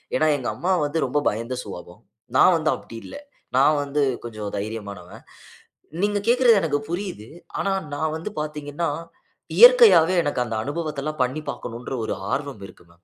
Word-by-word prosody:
ஏன்னா, 155 - +2
எங்க 130 - -5
அம்மா 180 +3 -1
வந்து 145 +3 -2
ரொம்ப 135 +3 0
பயந்த 115 +4 -4
சுவாபம். 90 -3 -10 0.3
நான் - - +6
வந்து - - 0
அப்படி 115 - -12
இல்ல. - - -10 0.4
நான் 145 +2 +4
வந்து 145 +1 -1 0.2
கொஞ்சம் 110 -3 -6
தைரியமானவன். 100 -3 -7 0.8
நீங்க 205 0 +1
கேக்கறது 240 -4 +5
எனக்கு 145 -3 0
புரியுது. 175 - -5 0.3
ஆனா, 195 - 0 0.2
நான் 155 +1 -1
வந்து 160 +6 -5
பார்த்தீங்கன்னா, 150 +1 -3 0.7
இயற்கையாவே 470 - +8
எனக்கு 145 -4 0
அந்த 115 -2 -4
அனுபவத்த 150 0 -4
எல்லாம் 155 -2 -3
பண்ணி 135 +5 -3
பார்க்கணும்ன்ற, 120 0 -7
ஒரு - - -2 0.2
ஆர்வம் 140 -7 -3
இருக்கு 90 - -18
மேம். 85 +1 -27
145 Hz, 155 wpm, -23 LUFS, 115-165 Hz, 0.8 s, இயற்கையாவே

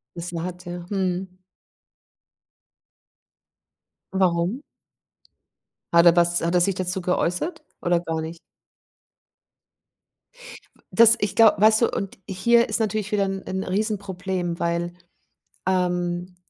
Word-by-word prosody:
Das 175 0 -6
wa 165 -1 -3
hat, 180 0 -7
ja. 175 0 -7
Mhm. 185 -1 -3 2.7
Warum? 185 +5 0 1.3
Hat 170 0 +6
er 170 - +9
das 175 0 +2
hat 170 +1 -1
er 180 - +4
sich 195 +1 +2
dazu 185 0 -2
geäußert 180 - -1 0.2
oder 175 0 +2
gar 165 -2 -3
nicht? 160 +1 -7 2.4
W - - -27
das 230 0 +7
ich 205 -2 -2
glaube 210 -3 +5
weißt 220 +1 +5
du, 235 - +3
und 195 -1 -5
hier 235 +5 +3
ist - - 0
natürlich 215 -2 -2
wieder 205 -2 +1
'n 195 0 -4
'n 190 0 -3
Riesenproblem, 190 -3 -3
weil, 170 0 -1 0.7
ähm 180 -1 -1
180 Hz, 120 wpm, -23 LUFS, 175-200 Hz, 2.7 s, er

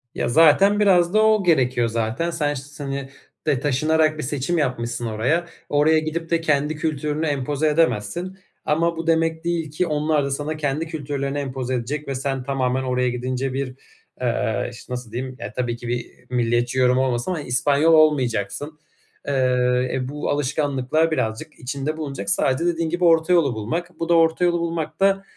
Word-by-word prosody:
Ya 120 - -1
zaten 165 - +5
biraz 180 -3 +4
da 215 - +5
o 215 -2 +4
gerekiyor 125 -8 +2
zaten. 115 +8 -1
Sen 150 -3 0
ş 135 - -5
s 145 +1 -10
hani, 135 -1 -4 0.4
de 130 - +2
taşınarak 155 +3 +2
bir 150 - -4
seçim 145 +5 -1
yapmışsın 120 -4 -2
oraya. 125 +11 0 0.2
Oraya 155 +2 +4
gidip 160 +1 -4
de 165 -1 +1
kendi 150 -1 +1
kültürünü 150 0 -2
empoze 145 +1 0
edemezsin 165 - 0 0.3
ama 165 +2 +1
bu 165 0 -5
demek 165 0 +1
değil 165 -3 -2
ki 175 +3 -1
onlar 150 -1 +1
da 140 - -3
sana 150 +3 -3
kendi 150 +2 -1
kültürlerini 145 -2 -3
empoze 130 -2 -3
edecek 140 +5 -3
ve 135 - -2
sen 135 0 -2
tamamen 130 -1 -1
oraya 125 -1 0
gidince 130 +2 -3
bir, 130 -1 -3 0.5
eee, - - -1
işte, 125 - -9
nasıl 125 -3 -6
diyeyim, 130 +2 -5
ya, - - -6
tabii 120 -2 -2
ki 120 - -8
bir 120 0 -3 0.2
milliyetçi 120 +1 0
yorum 125 0 +4
olmasın 130 +4 0
ama 165 -4 -2
İspanyol 145 +5 +2
olmayacaksın. 145 -1 +2 0.5
Eee, 125 -2 +2
e, 130 -1 -2
bu 145 +2 -4
alışkanlıklar 145 +2 0
birazcık 115 +1 -3
içinde 140 +4 -3
bulunacak. 135 -10 -5
Sadece 130 - +1
dediğin 165 -1 0
gibi 175 +2 -2
orta 165 +1 +4
yolu 150 -7 +3
bulmak. 160 +12 -4
Bu 165 - -3
da - - +5
orta 165 +2 +3
yolu 175 -1 +2
bulmak 165 -1 -3
da, 195 0 +3
145 Hz, 175 wpm, -22 LUFS, 125-160 Hz, 0.5 s, zaten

